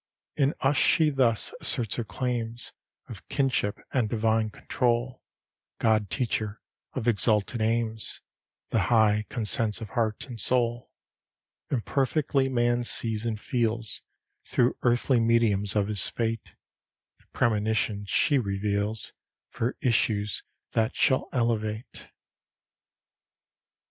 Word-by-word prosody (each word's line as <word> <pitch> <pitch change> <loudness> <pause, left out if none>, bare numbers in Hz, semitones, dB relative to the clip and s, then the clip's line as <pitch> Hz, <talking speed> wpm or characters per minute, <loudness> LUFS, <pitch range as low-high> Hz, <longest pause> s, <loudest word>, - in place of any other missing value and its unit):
In 140 -1 +1
us 135 +1 +2
she 155 +3 +4
thus 125 -5 +1
asserts 115 -7 +2
her 120 - -1
claims 120 0 -4 0.4
Of - - -11
kinship 130 -6 0 0.2
and 120 -5 +1
divine 110 0 +1
control; 120 +2 -1 0.6
God 110 -3 +2
teacher 110 0 -2 0.3
of 125 -3 -3
exalted 110 +1 +1
aims, 110 0 -1 0.5
The - - +1
high 105 -2 +3
consents 115 -1 +1
of 110 -2 -7
heart 110 -1 -1
and 120 -5 -9
soul: 120 0 +1 0.8
Imperfectly 135 +2 0
man 120 -1 +1
sees 115 -1 +2
and 110 -2 -2
feels, 115 -2 -1 0.4
Through 125 0 +1
earthly 120 +1 +2
mediums 115 -3 +2
of 100 -1 +2
his 105 -3 -2
fate, 115 -2 -3 0.6
The - - -29
premonitions 105 -2 0
she 145 -2 +3
reveals 100 0 -2 0.4
For 120 +3 -2
issues 105 -4 +1 0.3
that 110 +2 0
shall 130 - +2
elevate. 115 -2 -2
115 Hz, 110 wpm, -27 LUFS, 110-125 Hz, 0.8 s, she